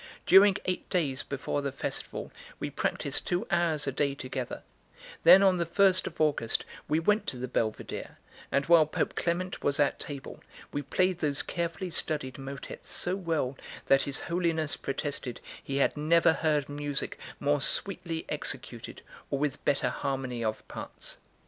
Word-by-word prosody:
During 195 +1 +7
eight 185 -1 -2
days 145 -7 0
before 140 +1 -3
the 140 -1 -2
festival 135 - -5 0.3
we - - -3
practised - - -1
two 175 0 0
hours 170 -4 +2
a 135 - 0
day 140 +1 0
together; 130 -2 -5 0.6
then 195 - +9
on 190 -2 +5
the 170 - 0
first 185 +1 +4
of - - -8
August 150 -7 +1 0.2
we 155 +2 +2
went 210 +6 +2
to 125 - -2
the 125 +1 -3
Belvedere, 110 -3 -3 0.3
and 140 0 +2
while 165 -2 +6
Pope - - -1
Clement 180 +2 -1
was 140 0 +1
at 145 - +2
table, 140 -2 -7 0.3
we 145 - -1
played 180 +5 +1
those 145 -3 0
carefully 170 +1 -3
studied 150 -5 0
motets 135 +1 -8
so 180 +1 -1
well 160 -8 -1 0.3
that 135 0 +5
his 140 0 -2
Holiness 165 -3 0
protested 140 -3 -3 0.2
he 135 - -2
had 140 - +3
never 160 +2 +4
heard 150 -3 +1
music 145 -1 -3 0.2
more 145 0 +2
sweetly 170 +1 0
executed - - -4 0.3
or 140 - 0
with 145 -1 -2
better 140 -1 +2
harmony 130 -3 -2
of 110 -1 -3
parts. - - -7
150 Hz, 160 wpm, -29 LUFS, 140-170 Hz, 0.6 s, then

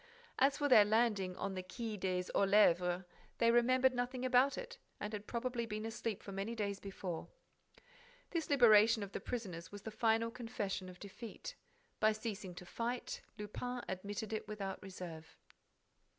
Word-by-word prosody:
As 275 +1 +4
for 290 - +1
their 235 -6 +9
landing 210 -4 +2
on 195 +1 -3
the 185 - -3
Quai 220 +4 -5
des 185 -2 -1
Orfèvres, 185 -3 +4 0.3
they 230 0 +4
remembered 255 +2 +4
nothing 250 +1 -2
about 255 +2 +4
it - - -7 0.2
and 210 +1 -4
had 210 0 -5
probably 235 -1 -2
been 215 0 -4
asleep 225 -2 -3
for 200 - -7
many 195 +4 -3
days 200 -2 -2
before. 190 -4 -5 1.0
This 335 -3 -2
liberation 225 -5 +6
of 200 - -7
the - - -3
prisoners 180 -9 -5
was 205 -1 -9
the 220 - -5
final 225 +1 +2
confession 210 -6 -4
of 180 - -11
defeat. 220 - -8 0.5
By 215 0 +4
ceasing 210 -4 -5
to 180 - -9
fight, 235 +6 -3 0.2
Lupin 245 +4 -4
admitted 205 +3 -4
it 220 - -3
without 200 -3 -4
reserve. 170 -4 -8
215 Hz, 160 wpm, -36 LUFS, 195-240 Hz, 1.0 s, their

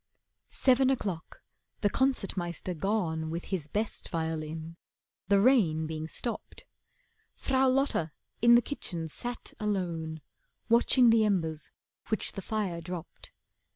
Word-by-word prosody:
Seven 260 0 +4
o'clock, 195 -11 -3 0.4
the 205 - +3
Concert 265 -7 +1
Meister 175 0 -3
gone 165 -3 -1
With 170 +2 -4
his 180 -7 -2
best 210 +7 -2
violin, 160 0 -3 0.5
the 200 -1 +5
rain 195 -10 +4
being 155 0 -4
stopped, 235 +8 -6 0.7
Frau 265 -1 +2
Lotta 255 - +1 0.3
in 235 +1 +8
the 240 - +5
kitchen 175 - -3
sat 240 +10 -6
alone 170 -7 -2 0.5
Watching 235 +1 +5
the 225 -1 +5
embers 165 -7 0 0.4
which 220 - 0
the 195 - -6
fire 190 -4 -2
dropped. 175 -1 -8
190 Hz, 120 wpm, -30 LUFS, 160-235 Hz, 0.7 s, in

